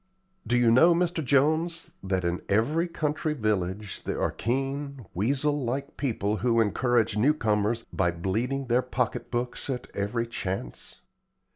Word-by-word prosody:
Do 120 Hz, -, +3 dB
you 120 Hz, -2 st, +4 dB
know, 165 Hz, +9 st, +6 dB
Mr. 170 Hz, -2 st, 0 dB
Jones, 155 Hz, +5 st, +1 dB
that 95 Hz, -2 st, -1 dB
in 85 Hz, +1 st, -1 dB
every 145 Hz, -, +2 dB
country 155 Hz, -1 st, -1 dB
village 105 Hz, -4 st, -2 dB
there -, -, -3 dB
are -, -, +1 dB
keen, 135 Hz, +1 st, -3 dB
weasel 140 Hz, -, 0 dB
like 135 Hz, +4 st, -3 dB
people 110 Hz, -6 st, -1 dB
who 115 Hz, +2 st, +2 dB
encourage 115 Hz, 0 st, +2 dB
new 140 Hz, +8 st, +4 dB
comers 110 Hz, -2 st, 0 dB
by 90 Hz, -3 st, +2 dB
bleeding 110 Hz, +11 st, -1 dB
their 120 Hz, 0 st, +2 dB
pocket 125 Hz, -1 st, -2 dB
books 120 Hz, +2 st, -3 dB
at 125 Hz, -2 st, -3 dB
every 105 Hz, +4 st, -1 dB
chance? 95 Hz, -, -5 dB
120 Hz, 145 wpm, -27 LUFS, 105-140 Hz, -, know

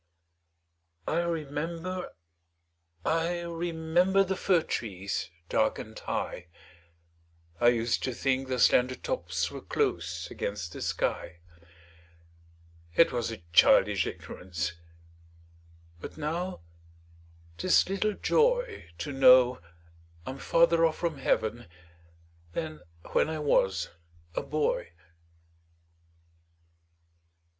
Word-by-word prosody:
I 165 Hz, -, +1 dB
remember, 170 Hz, +2 st, -3 dB, 1.0 s
I 165 Hz, +2 st, 0 dB
remember, 170 Hz, +3 st, +1 dB
The 190 Hz, 0 st, -2 dB
fir 180 Hz, -3 st, +2 dB
trees 100 Hz, -5 st, -3 dB, 0.2 s
dark -, -, +1 dB
and -, -, -8 dB
high; 90 Hz, -, -4 dB, 1.1 s
I 120 Hz, -, +4 dB
used 115 Hz, -1 st, +2 dB
to 130 Hz, -, -2 dB
think 135 Hz, +2 st, 0 dB
their 130 Hz, -1 st, -1 dB
slender 125 Hz, +1 st, +4 dB
tops -, -, -2 dB
Were -, -, -7 dB
close -, -, -2 dB
against 95 Hz, -5 st, -4 dB
the -, -, -7 dB
sky: 85 Hz, -, -2 dB, 1.6 s
It 165 Hz, -, +5 dB
was 120 Hz, -3 st, -1 dB
a 110 Hz, -7 st, -8 dB
childish -, -, +5 dB
ignorance, 90 Hz, -1 st, -5 dB, 1.3 s
But -, -, -9 dB
now 165 Hz, -, -3 dB, 1.0 s
'tis 185 Hz, -, +4 dB
little 195 Hz, +2 st, 0 dB
joy -, -, +1 dB
To 85 Hz, -, -4 dB
know 130 Hz, -4 st, +6 dB, 0.6 s
I'm 135 Hz, +1 st, -6 dB
farther 170 Hz, 0 st, +4 dB
off 160 Hz, -1 st, +2 dB
from 165 Hz, -5 st, -2 dB
Heav'n 115 Hz, -3 st, 0 dB, 0.9 s
Than 155 Hz, -2 st, -4 dB, 0.3 s
when -, -, +2 dB
I 160 Hz, -, -3 dB
was 95 Hz, -, +1 dB, 0.4 s
a -, -, -1 dB
boy. 150 Hz, -, -1 dB
150 Hz, 100 wpm, -29 LUFS, 120-170 Hz, 1.6 s, know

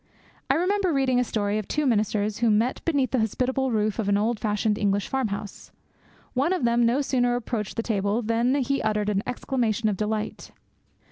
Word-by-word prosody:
I -, -, +4 dB
remember 370 Hz, +2 st, +1 dB
reading 265 Hz, -3 st, +2 dB
a -, -, +3 dB
story 210 Hz, -2 st, -1 dB
of 215 Hz, -, -6 dB
two 300 Hz, -1 st, -1 dB
ministers 215 Hz, -3 st, 0 dB
who 235 Hz, -1 st, +3 dB
met 220 Hz, +4 st, +1 dB
beneath 280 Hz, -7 st, +1 dB
the 260 Hz, -, +1 dB
hospitable 260 Hz, +4 st, 0 dB
roof 215 Hz, -1 st, 0 dB
of 205 Hz, -3 st, 0 dB
an 200 Hz, -, +3 dB
old 220 Hz, +2 st, 0 dB
fashioned 210 Hz, -1 st, 0 dB
English 200 Hz, -1 st, +1 dB
farm 265 Hz, -3 st, 0 dB
house. 200 Hz, 0 st, -7 dB, 0.6 s
One 280 Hz, +8 st, +1 dB
of 365 Hz, -, -2 dB
them 235 Hz, 0 st, +3 dB
no 250 Hz, +5 st, +2 dB
sooner 245 Hz, -3 st, +1 dB
approached 225 Hz, -4 st, -3 dB
the 230 Hz, -, -2 dB
table 205 Hz, +1 st, 0 dB
than 230 Hz, +4 st, +1 dB
he 275 Hz, 0 st, 0 dB
uttered 210 Hz, -1 st, 0 dB
an 200 Hz, -1 st, +1 dB
exclamation 235 Hz, -3 st, -1 dB
of 200 Hz, -, -2 dB
delight. 215 Hz, +1 st, -3 dB
230 Hz, 195 wpm, -25 LUFS, 210-260 Hz, 0.6 s, I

